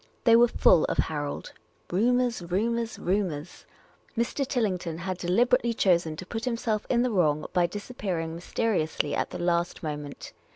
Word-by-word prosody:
They 230 Hz, -1 st, +6 dB
were 240 Hz, +1 st, +7 dB
full 180 Hz, -7 st, +4 dB
of -, -, -2 dB
Harold. 145 Hz, -2 st, -2 dB, 0.4 s
Rumours, 240 Hz, +4 st, +2 dB
rumours, 225 Hz, +7 st, -1 dB
rumours! 180 Hz, -5 st, -2 dB, 0.5 s
Mr. 255 Hz, +4 st, 0 dB
Tillington 185 Hz, -, -1 dB
had 185 Hz, +1 st, -4 dB
deliberately 235 Hz, +6 st, +2 dB
choseti 170 Hz, -6 st, +2 dB
to 185 Hz, -, -7 dB
put 225 Hz, +5 st, -4 dB
himself 230 Hz, -3 st, -1 dB
in 240 Hz, -1 st, +3 dB
the 250 Hz, -, 0 dB
wrong 155 Hz, -6 st, +2 dB
by 175 Hz, -1 st, +3 dB
dis 205 Hz, +7 st, -7 dB
appearing 170 Hz, -8 st, -3 dB
mysteriously 165 Hz, -4 st, -1 dB
at -, -, -1 dB
the -, -, -6 dB
last 175 Hz, 0 st, 0 dB
moment. 150 Hz, -2 st, -6 dB
185 Hz, 155 wpm, -27 LUFS, 170-230 Hz, 0.5 s, were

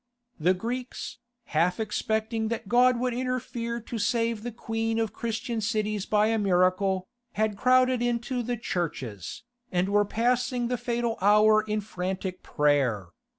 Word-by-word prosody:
The 180 Hz, +4 st, +3 dB
Greeks, 240 Hz, +4 st, -5 dB, 0.3 s
half 175 Hz, +5 st, +2 dB
expecting 220 Hz, +1 st, -1 dB
that 225 Hz, -1 st, -3 dB
God 245 Hz, +2 st, +4 dB
would 250 Hz, 0 st, 0 dB
interfere 245 Hz, -2 st, -2 dB
to 230 Hz, +1 st, -5 dB
save 230 Hz, +1 st, 0 dB
the 240 Hz, +2 st, -5 dB
queen 225 Hz, 0 st, -2 dB
of 225 Hz, -2 st, -1 dB
Christian 230 Hz, 0 st, -3 dB
cities 215 Hz, -2 st, -1 dB
by 210 Hz, 0 st, +3 dB
a 225 Hz, 0 st, +1 dB
miracle, 185 Hz, 0 st, +2 dB, 0.3 s
had 215 Hz, 0 st, 0 dB
crowded 255 Hz, +2 st, +3 dB
into 240 Hz, +1 st, -1 dB
the 240 Hz, +1 st, -2 dB
churches, 140 Hz, -, -4 dB, 0.3 s
and 180 Hz, +1 st, +1 dB
were 205 Hz, +1 st, +4 dB
passing 240 Hz, +3 st, 0 dB
the 250 Hz, -, 0 dB
fatal 235 Hz, -1 st, -1 dB
hour 210 Hz, +2 st, +6 dB
in 215 Hz, 0 st, -2 dB
frantic 185 Hz, -1 st, -4 dB
prayer! 135 Hz, -11 st, +1 dB
220 Hz, 145 wpm, -27 LUFS, 195-235 Hz, 0.3 s, hour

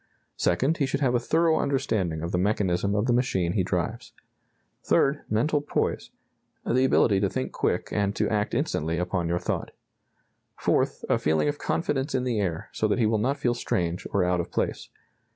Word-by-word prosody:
Second, 135 Hz, -, +1 dB
he 140 Hz, -, +1 dB
should 140 Hz, +1 st, -2 dB
have 130 Hz, -3 st, +2 dB
a 120 Hz, -, +3 dB
thorough 160 Hz, +5 st, +2 dB
understanding 105 Hz, -, -1 dB
of 85 Hz, -, -3 dB
the 90 Hz, -, 0 dB
mechanism 100 Hz, -1 st, +1 dB
of 105 Hz, +1 st, +1 dB
the 120 Hz, -, +2 dB
machine 95 Hz, -8 st, +1 dB
he 100 Hz, -, +1 dB
drives. 90 Hz, -2 st, -3 dB, 0.7 s
Third, 140 Hz, +1 st, +2 dB
mental 145 Hz, +8 st, +1 dB
poise 145 Hz, -, -2 dB, 0.6 s
the 130 Hz, +2 st, +2 dB
ability 105 Hz, -6 st, +4 dB
to 100 Hz, 0 st, +1 dB
think 65 Hz, -6 st, -3 dB
quick -, -, -1 dB
and 100 Hz, -1 st, 0 dB
to -, -, +1 dB
act 105 Hz, +1 st, -1 dB
instantly 85 Hz, -, -1 dB
upon 90 Hz, 0 st, -1 dB
your 85 Hz, +1 st, 0 dB
thought. -, -, -3 dB, 0.9 s
Fourth, -, -, 0 dB
a -, -, +2 dB
feeling 80 Hz, -, +1 dB
of 145 Hz, 0 st, -2 dB
confidence 140 Hz, -4 st, -1 dB
in 130 Hz, -, +1 dB
the 120 Hz, -4 st, 0 dB
air, 95 Hz, 0 st, -2 dB
so 110 Hz, -, 0 dB
that 105 Hz, -, +1 dB
he 120 Hz, -, +2 dB
will 110 Hz, 0 st, +2 dB
not 135 Hz, +6 st, 0 dB
feel 125 Hz, -4 st, +1 dB
strange 90 Hz, -7 st, -2 dB
or 100 Hz, -, +2 dB
out 90 Hz, 0 st, +1 dB
of 85 Hz, -, -3 dB
place. -, -, -2 dB
105 Hz, 190 wpm, -26 LUFS, 90-130 Hz, 0.9 s, ability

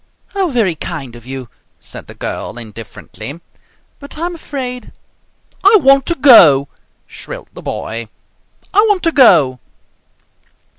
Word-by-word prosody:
"How 390 Hz, -2 st, -1 dB
very 230 Hz, -, 0 dB
kind 145 Hz, -6 st, -7 dB
of 120 Hz, 0 st, -14 dB
you!" 130 Hz, -2 st, -7 dB, 0.3 s
said -, -, -12 dB
the -, -, -12 dB
girl -, -, -6 dB
indifferently. 115 Hz, +6 st, -9 dB, 0.6 s
"But 280 Hz, +1 st, -10 dB
I'm 345 Hz, +3 st, -3 dB
afraid 260 Hz, -6 st, -7 dB, 0.4 s
" -, -, -32 dB
"I 405 Hz, +3 st, +7 dB
want 275 Hz, -3 st, +4 dB
to 340 Hz, -, 0 dB
go!" 165 Hz, -, +6 dB, 0.4 s
shrilled -, -, -10 dB
the -, -, -11 dB
boy. 115 Hz, 0 st, -5 dB, 0.6 s
"I 395 Hz, -, +4 dB
want 400 Hz, -3 st, +1 dB
to 330 Hz, -, +2 dB
go!" 145 Hz, -, +4 dB
235 Hz, 135 wpm, -15 LUFS, -, 0.6 s, I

